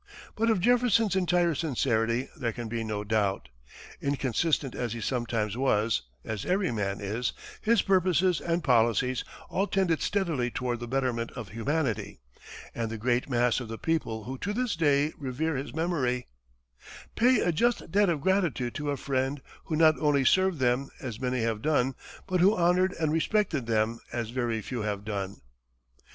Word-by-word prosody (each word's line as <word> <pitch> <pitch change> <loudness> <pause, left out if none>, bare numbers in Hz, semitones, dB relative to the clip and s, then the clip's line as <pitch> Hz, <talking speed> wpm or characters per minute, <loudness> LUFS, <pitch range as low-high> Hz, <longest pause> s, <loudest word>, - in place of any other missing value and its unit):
But 225 +1 +1
of 220 - +3
Jefferson's 230 -2 +3
entire 175 -2 +2
sincerity 125 -5 0
there 120 -6 -2
can 120 0 -5
be 115 +1 -3
no 105 -2 -3
doubt. 100 - 0 0.5
Inconsistent 140 +1 0
as 120 -3 -3
he 120 - -5
sometimes 115 -3 -1
was 115 -4 +1 0.2
as 110 -3 -4
every 185 0 +1
man 100 -3 -2
is 110 +4 -2 0.3
his 225 -1 +3
purposes 185 -3 +2
and 170 0 -1
policies 125 0 +2 0.2
all 195 +2 0
tended 185 -6 +1
steadily 165 -12 0
toward 120 -1 -2
the 120 - -6
betterment 125 -2 -1
of 120 -6 -7
humanity; 115 - -2 0.5
and 115 -1 -2
the 115 - -4
great 120 +4 0
mass 120 -1 +2
of 125 - -6
the 115 0 -6
people 115 -9 -1
who 130 +3 -6
to 205 - -2
this 245 -2 -1
day 150 -1 +2
revere 145 +3 -2
his 135 +2 -4
memory, 145 -7 -1 0.9
"pay 250 0 +4
a 175 - +2
just 235 +2 0
debt 205 -1 +4
of 160 -4 0
gratitude 175 -10 +1
to 150 -1 -3
a 140 - -1
friend 135 +1 -1 0.3
who 160 - -2
not 155 0 +5
only 145 -3 +2
served 185 +1 +3
them, 130 +1 +1
as 120 -5 -6
many 125 -2 0
have 115 -2 -1
done, 135 -3 +2 0.3
but 185 -1 0
who 195 +5 +5
honored 180 +2 +3
and 155 -2 +1
respected 165 - +1
them, 115 +1 +1
as 120 -2 -3
very 120 -3 -1
few 125 +1 -4
have 105 -1 -3
done." 100 -2 -4
135 Hz, 170 wpm, -28 LUFS, 115-170 Hz, 0.9 s, not